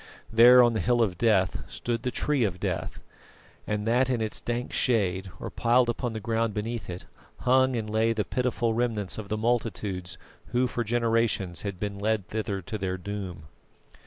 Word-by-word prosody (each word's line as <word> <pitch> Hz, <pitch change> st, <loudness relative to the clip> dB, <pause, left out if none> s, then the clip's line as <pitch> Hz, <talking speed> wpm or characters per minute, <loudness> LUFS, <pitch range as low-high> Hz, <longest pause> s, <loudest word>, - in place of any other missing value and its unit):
There 125 Hz, +2 st, +8 dB
on 120 Hz, -1 st, +3 dB
the 110 Hz, -, 0 dB
Hill 120 Hz, +4 st, +3 dB
of 95 Hz, -5 st, -2 dB
Death 100 Hz, -5 st, +2 dB
stood 115 Hz, -1 st, -3 dB
the 125 Hz, -, -1 dB
Tree 140 Hz, +1 st, 0 dB
of 95 Hz, -4 st, -1 dB
Death; -, -, -3 dB, 0.6 s
and 105 Hz, 0 st, -1 dB
that 125 Hz, +3 st, +2 dB
in 125 Hz, -2 st, +1 dB
its 110 Hz, -1 st, -3 dB
dank 120 Hz, +1 st, -3 dB
shade, 95 Hz, -6 st, +1 dB
or -, -, -6 dB
piled 120 Hz, +1 st, +3 dB
upon 120 Hz, 0 st, -2 dB
the 110 Hz, -, -4 dB
ground 115 Hz, 0 st, -1 dB
beneath 110 Hz, 0 st, -4 dB
it, 90 Hz, +1 st, -6 dB, 0.4 s
hung 130 Hz, 0 st, +3 dB
and 110 Hz, -2 st, -2 dB
lay 110 Hz, +1 st, +2 dB
the 110 Hz, -2 st, -1 dB
pitiful 125 Hz, -2 st, 0 dB
remnants 110 Hz, -4 st, -1 dB
of 105 Hz, -, -6 dB
the 110 Hz, -, -1 dB
multitudes 105 Hz, -6 st, -2 dB, 0.3 s
who 125 Hz, +1 st, +1 dB
for 120 Hz, -1 st, -2 dB
generations 115 Hz, -5 st, 0 dB
had 100 Hz, -3 st, -5 dB
been 100 Hz, 0 st, -4 dB
led 105 Hz, -1 st, -1 dB
thither 105 Hz, -3 st, -3 dB
to 110 Hz, +5 st, -5 dB
their 95 Hz, -1 st, -2 dB
doom. 95 Hz, -3 st, -6 dB
110 Hz, 185 wpm, -27 LUFS, 100-120 Hz, 0.6 s, There